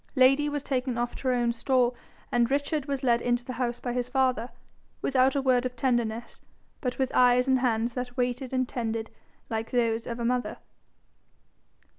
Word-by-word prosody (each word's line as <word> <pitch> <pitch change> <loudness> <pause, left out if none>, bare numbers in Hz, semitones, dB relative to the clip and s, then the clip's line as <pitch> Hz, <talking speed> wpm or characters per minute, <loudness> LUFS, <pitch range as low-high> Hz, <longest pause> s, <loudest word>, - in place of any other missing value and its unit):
Lady 270 +3 +5
was 290 -1 -3
taken 255 -3 -1
off 240 0 -2
to 265 - -5
her 255 - +3
own 240 -1 +1
stall, 250 0 +1 0.4
and 240 -1 +2
Richard 285 +1 -1
was 275 -1 -2
led 235 -2 +3
into 240 0 0
the 255 - -5
house 240 -1 -1
by 245 - -3
his 245 0 -1
father 255 -3 +1 0.5
without 265 +1 +3
a 275 - +1
word 255 -2 +3
of 250 -1 -3
tenderness, 235 -2 -1 0.4
but 250 -3 -2
with 265 -1 0
eyes 250 0 +4
and 260 -1 +3
hands 235 -1 0
that 250 0 -5
waited 250 +1 -1
and 255 -1 0
tended 225 -2 -3 0.4
like 225 0 -3
those 230 -2 0
of 235 0 -4
a 235 - -2
mother. 250 +1 -1
250 Hz, 185 wpm, -27 LUFS, 240-260 Hz, 0.5 s, Lady